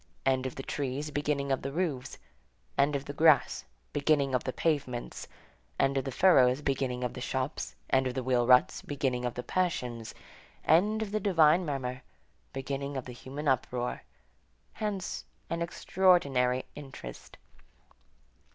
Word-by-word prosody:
End 130 Hz, -1 st, +2 dB
of 130 Hz, -, -7 dB
the 135 Hz, -, -6 dB
trees, 145 Hz, +2 st, -3 dB
beginning 145 Hz, -1 st, -1 dB
of 135 Hz, -, +1 dB
the 135 Hz, -, -4 dB
roofs; 140 Hz, -6 st, -2 dB, 0.6 s
end 140 Hz, +1 st, +3 dB
of 140 Hz, 0 st, -3 dB
the 145 Hz, -, -6 dB
grass, 155 Hz, 0 st, +4 dB, 0.3 s
beginning 145 Hz, -2 st, +2 dB
of 125 Hz, -, +1 dB
the 130 Hz, -, -1 dB
pavements; 140 Hz, -6 st, -2 dB, 0.5 s
end 135 Hz, 0 st, +3 dB
of 135 Hz, -, 0 dB
the 135 Hz, -, -3 dB
furrows, 130 Hz, -5 st, +5 dB
beginning 130 Hz, -2 st, -1 dB
of 125 Hz, -, -2 dB
the 125 Hz, -, -7 dB
shops, 130 Hz, +3 st, -3 dB, 0.2 s
end 130 Hz, 0 st, +3 dB
of 125 Hz, -, -4 dB
the 130 Hz, -, -2 dB
wheel 120 Hz, -1 st, +2 dB
ruts, 125 Hz, 0 st, +5 dB
beginning 130 Hz, -4 st, -1 dB
of 120 Hz, -, -2 dB
the 125 Hz, -, -4 dB
passions; 125 Hz, -11 st, -2 dB, 0.5 s
end 210 Hz, +7 st, +4 dB
of 205 Hz, -, -6 dB
the 215 Hz, -, 0 dB
divine 175 Hz, -3 st, +4 dB
murmur, 130 Hz, -3 st, -3 dB, 0.5 s
beginning 140 Hz, +1 st, -4 dB
of 130 Hz, -, -4 dB
the 125 Hz, -, -7 dB
human 140 Hz, +5 st, -6 dB
uproar; 125 Hz, -2 st, 0 dB, 0.7 s
hence 205 Hz, -4 st, -3 dB, 0.3 s
an 170 Hz, 0 st, -1 dB
extraordinary 145 Hz, -8 st, +2 dB
interest. 135 Hz, -, -10 dB
135 Hz, 150 wpm, -30 LUFS, 125-150 Hz, 0.7 s, furrows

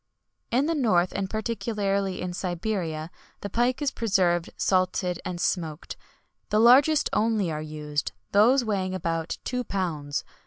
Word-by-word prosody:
"In 255 Hz, +4 st, +2 dB
the 330 Hz, -, +1 dB
north, 215 Hz, -, +2 dB
and 195 Hz, -1 st, -2 dB
particularly 205 Hz, -3 st, -1 dB
in 180 Hz, 0 st, -3 dB
Siberia, 175 Hz, -3 st, -3 dB, 0.3 s
the 200 Hz, -, -5 dB
pike 245 Hz, +5 st, +1 dB
is 285 Hz, -, +1 dB
preserved 180 Hz, -6 st, +1 dB
salted 185 Hz, -1 st, +1 dB
and 180 Hz, -1 st, -4 dB
smoked; 165 Hz, -3 st, -2 dB, 0.5 s
the 210 Hz, -, +2 dB
largest 270 Hz, +6 st, +6 dB
only 210 Hz, -4 st, +1 dB
are 155 Hz, 0 st, -3 dB
used, 150 Hz, -1 st, -3 dB, 0.2 s
those 240 Hz, +6 st, +5 dB
weighing 190 Hz, -3 st, -1 dB
about 165 Hz, -2 st, -2 dB
two 250 Hz, 0 st, -2 dB
pounds. 160 Hz, -9 st, -3 dB
190 Hz, 140 wpm, -26 LUFS, 175-225 Hz, 0.5 s, largest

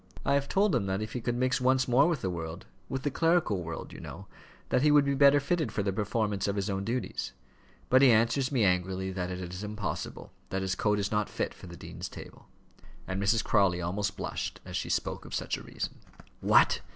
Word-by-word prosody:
I 140 Hz, -, +3 dB
have 140 Hz, 0 st, +1 dB
told 200 Hz, -1 st, +3 dB
him 110 Hz, -6 st, +1 dB
that 95 Hz, +2 st, -1 dB
if 110 Hz, -, -7 dB
he 125 Hz, -, -3 dB
could 120 Hz, +1 st, -1 dB
mix 130 Hz, +1 st, +1 dB
once 130 Hz, +1 st, +3 dB
more 130 Hz, +5 st, +5 dB
with 165 Hz, -7 st, 0 dB
the 95 Hz, -, 0 dB
world, 80 Hz, -1 st, -6 dB, 0.2 s
with 130 Hz, 0 st, -3 dB
the 145 Hz, -, 0 dB
clerical 165 Hz, -, +2 dB
world, 85 Hz, 0 st, -6 dB
you -, -, -9 dB
know, 95 Hz, +3 st, -9 dB, 0.4 s
that -, -, +2 dB
he 150 Hz, -, +4 dB
would 145 Hz, -1 st, +6 dB
be 140 Hz, -, +1 dB
better 140 Hz, +1 st, +6 dB
fitted 155 Hz, +3 st, 0 dB
for 100 Hz, -, -1 dB
the 100 Hz, -1 st, 0 dB
performance 105 Hz, -1 st, -1 dB
of 100 Hz, -, 0 dB
his 100 Hz, 0 st, -1 dB
own 95 Hz, 0 st, -2 dB
duties. 120 Hz, +5 st, -3 dB, 0.5 s
But 130 Hz, +1 st, +5 dB
he 135 Hz, -, +8 dB
answers 120 Hz, +4 st, +3 dB
me 125 Hz, -5 st, +2 dB
angrily, 95 Hz, 0 st, +1 dB
that 90 Hz, -1 st, -3 dB
it 90 Hz, -, -4 dB, 0.2 s
is 90 Hz, +3 st, -6 dB
impossible 105 Hz, -3 st, -5 dB, 0.2 s
that 95 Hz, +1 st, -2 dB
his 95 Hz, 0 st, 0 dB
coat 105 Hz, +1 st, +1 dB
is 100 Hz, -2 st, -1 dB
not 105 Hz, -1 st, 0 dB
fit -, -, -2 dB
for -, -, -12 dB
the -, -, -10 dB
dean's -, -, -7 dB
table," -, -, -11 dB, 0.6 s
and 95 Hz, +1 st, -2 dB
Mrs. 105 Hz, +3 st, +2 dB
Crawley 100 Hz, -5 st, +3 dB
almost 100 Hz, +4 st, -2 dB
blushed -, -, -4 dB
as -, -, -7 dB
she -, -, -2 dB
spoke -, -, -1 dB
of -, -, -6 dB
such -, -, -1 dB
a -, -, -8 dB
reason. -, -, -6 dB, 0.4 s
"What! -, -, +4 dB
105 Hz, 230 wpm, -29 LUFS, 95-130 Hz, 0.6 s, he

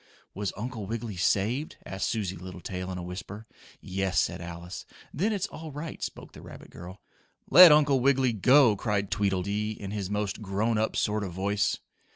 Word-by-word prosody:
"Was 100 Hz, 0 st, -3 dB
Uncle 110 Hz, -2 st, -5 dB
Wiggily 115 Hz, -1 st, -4 dB
saved?" 105 Hz, -, 0 dB
asked 95 Hz, -, -3 dB
Susie 100 Hz, -5 st, -2 dB
Littletail 90 Hz, 0 st, -6 dB
in 90 Hz, -, -5 dB
a 90 Hz, -, -5 dB
whisper. 95 Hz, +4 st, -7 dB, 0.4 s
"Yes," 95 Hz, -1 st, -1 dB
said -, -, -1 dB
Alice. 85 Hz, +2 st, -7 dB, 0.3 s
"Then 195 Hz, +10 st, 0 dB
it's 200 Hz, -3 st, -1 dB
all 160 Hz, -5 st, -8 dB
right," 150 Hz, +3 st, -7 dB
spoke -, -, -6 dB
the -, -, -13 dB
rabbit -, -, -12 dB
girl. 90 Hz, +3 st, -11 dB, 0.5 s
"Let 180 Hz, -2 st, +11 dB
Uncle 145 Hz, -3 st, +5 dB
Wiggily 130 Hz, -1 st, +3 dB
go!" 125 Hz, +1 st, +5 dB
cried 100 Hz, -1 st, -2 dB
Tweedledee 100 Hz, +1 st, 0 dB
in 100 Hz, -1 st, -6 dB
his 100 Hz, -3 st, -3 dB
most 105 Hz, 0 st, -2 dB
grown 105 Hz, +3 st, 0 dB
up 110 Hz, -, 0 dB
sort 105 Hz, 0 st, 0 dB
of 95 Hz, -3 st, -5 dB
voice. 100 Hz, +2 st, 0 dB
105 Hz, 175 wpm, -28 LUFS, 95-120 Hz, 0.5 s, Let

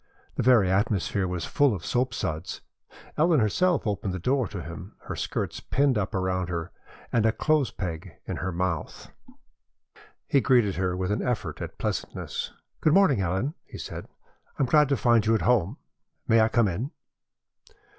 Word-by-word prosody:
The -, -, -2 dB
very 115 Hz, -6 st, +5 dB
atmosphere 100 Hz, -1 st, +1 dB
was 90 Hz, -1 st, -3 dB
full 145 Hz, -6 st, +2 dB
of 90 Hz, -, -7 dB
soapsuds. 105 Hz, -10 st, -2 dB, 0.6 s
Ellen 160 Hz, -1 st, +4 dB
herself 170 Hz, -, +2 dB
opened 100 Hz, -3 st, -2 dB
the -, -, -2 dB
door 125 Hz, +6 st, +1 dB
to 95 Hz, -5 st, -6 dB
him, 90 Hz, +5 st, -9 dB
her -, -, -6 dB
skirts -, -, -3 dB
pinned 140 Hz, -1 st, +1 dB
up 105 Hz, -2 st, -1 dB
around 95 Hz, -1 st, -1 dB
her, 85 Hz, -2 st, -3 dB, 0.4 s
and 115 Hz, -3 st, +3 dB
a 110 Hz, -, +4 dB
clothes 150 Hz, +1 st, +1 dB
peg 85 Hz, 0 st, -6 dB
in -, -, -4 dB
her 95 Hz, -, -2 dB
mouth. 85 Hz, -3 st, -3 dB, 1.1 s
He 140 Hz, -, +3 dB
greeted 120 Hz, -7 st, +3 dB
her 90 Hz, -1 st, 0 dB
with 95 Hz, +1 st, -1 dB
an 105 Hz, -, 0 dB
effort 125 Hz, -3 st, -2 dB
at -, -, -6 dB
pleasantness. -, -, -3 dB, 0.3 s
"Good 155 Hz, -, +3 dB
morning, 160 Hz, -, +5 dB
Ellen," 95 Hz, -, -1 dB
he -, -, -11 dB
said. -, -, -7 dB, 0.5 s
"I -, -, +2 dB
am -, -, +4 dB
glad 150 Hz, +2 st, +4 dB
to 140 Hz, -, +2 dB
find 120 Hz, -2 st, +4 dB
you 110 Hz, +1 st, +3 dB
at -, -, 0 dB
home. 120 Hz, -, +2 dB, 0.5 s
May 115 Hz, 0 st, +5 dB
I 110 Hz, -, +5 dB
come 115 Hz, -1 st, +3 dB
in?" 105 Hz, +9 st, -2 dB
110 Hz, 175 wpm, -26 LUFS, 95-130 Hz, 1.1 s, very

